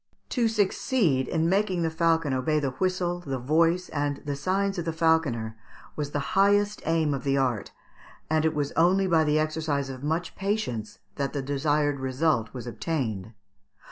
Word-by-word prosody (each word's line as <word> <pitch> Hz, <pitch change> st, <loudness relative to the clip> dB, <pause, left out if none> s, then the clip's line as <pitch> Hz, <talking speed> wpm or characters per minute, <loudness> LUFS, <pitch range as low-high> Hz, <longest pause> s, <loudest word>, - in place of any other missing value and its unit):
To 240 Hz, -3 st, +1 dB
succeed 200 Hz, -, +1 dB
in 160 Hz, +1 st, +1 dB
making 190 Hz, -1 st, +1 dB
the 165 Hz, -, 0 dB
falcon 165 Hz, -3 st, +1 dB
obey 140 Hz, +4 st, +1 dB
the 140 Hz, -3 st, -1 dB
whistle, 180 Hz, +2 st, -1 dB
the 135 Hz, -6 st, -4 dB
voice, 165 Hz, +7 st, +2 dB
and 145 Hz, -1 st, -1 dB
the 145 Hz, -1 st, -2 dB
signs 195 Hz, +5 st, 0 dB
of 170 Hz, -, -3 dB
the 165 Hz, -, 0 dB
falconer 155 Hz, -9 st, +1 dB, 0.4 s
was 150 Hz, -2 st, -3 dB
the 145 Hz, +7 st, -3 dB
highest 205 Hz, +1 st, +3 dB
aim 160 Hz, -2 st, +2 dB
of 135 Hz, -2 st, -4 dB
the 140 Hz, 0 st, +1 dB
art, 125 Hz, -6 st, 0 dB, 0.6 s
and 155 Hz, 0 st, +1 dB
it 160 Hz, -1 st, +1 dB
was 145 Hz, -1 st, -1 dB
only 180 Hz, +4 st, +3 dB
by 165 Hz, -3 st, +3 dB
the 150 Hz, 0 st, +2 dB
exercise 155 Hz, -3 st, -1 dB
of 130 Hz, -1 st, -8 dB
much 160 Hz, +4 st, -2 dB
patience 195 Hz, -, -2 dB, 0.2 s
that 140 Hz, -1 st, -2 dB
the 140 Hz, -2 st, -2 dB
desired 145 Hz, +1 st, 0 dB
resuit 130 Hz, -4 st, 0 dB
was 125 Hz, -2 st, -7 dB
obtained. 115 Hz, -, -3 dB
155 Hz, 175 wpm, -26 LUFS, 135-175 Hz, 0.6 s, highest